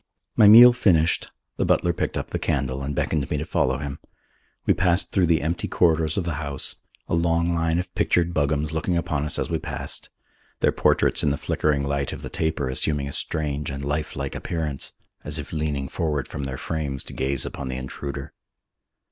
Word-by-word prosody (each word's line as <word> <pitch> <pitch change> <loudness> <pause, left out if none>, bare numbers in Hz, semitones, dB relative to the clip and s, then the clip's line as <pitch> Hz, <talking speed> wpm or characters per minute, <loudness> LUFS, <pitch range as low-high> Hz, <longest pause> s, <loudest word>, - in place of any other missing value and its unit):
My 105 - +7
meal 120 +3 +10
finished, 85 -8 +2 0.3
the - - +1
butler 85 - +2
picked - - -2
up - - -4
the - - -2
candle 65 0 -1
and 70 +1 -3
beckoned 75 -1 -1
me 75 - -1
to 75 - -3
follow 65 -4 +1
him. 70 -1 -5 0.7
We - - +4
passed 90 0 +2
through 95 -3 +3
the 80 -3 +2
empty 85 +3 -1
corridors 80 -2 +2
of 95 - +1
the 85 - -1
house, 70 -3 -3 0.3
a - - -3
long 85 +1 +2
line 80 0 +1
of 90 +1 -3
pictured 85 0 +1
Buggams 75 0 0
looking 85 +2 0
upon 75 -3 -1
us 75 - 0
as - - -2
we 80 - 0
passed, - - -4 0.5
their - - +3
portraits - - +2
in 75 - +2
the 70 - 0
flickering 70 -2 0
light 70 -1 -1
of - - -8
the - - -6
taper 80 -4 -1
assuming 70 +2 0
a - - -5
strange 75 -1 -2
and 70 0 -5
life 75 +2 -2
like 70 0 -4
appearance, 80 -5 -3 0.3
as 75 +1 -1
if 75 - -6
leaning 75 -3 -2
forward 75 -3 -2
from 70 - -5
their 65 -1 -4
frames 70 -4 -3
to - - -11
gaze 70 0 +1
upon 70 - -5
the 65 0 -4
intruder. 70 +2 -6
75 Hz, 200 wpm, -24 LUFS, 70-85 Hz, 0.7 s, meal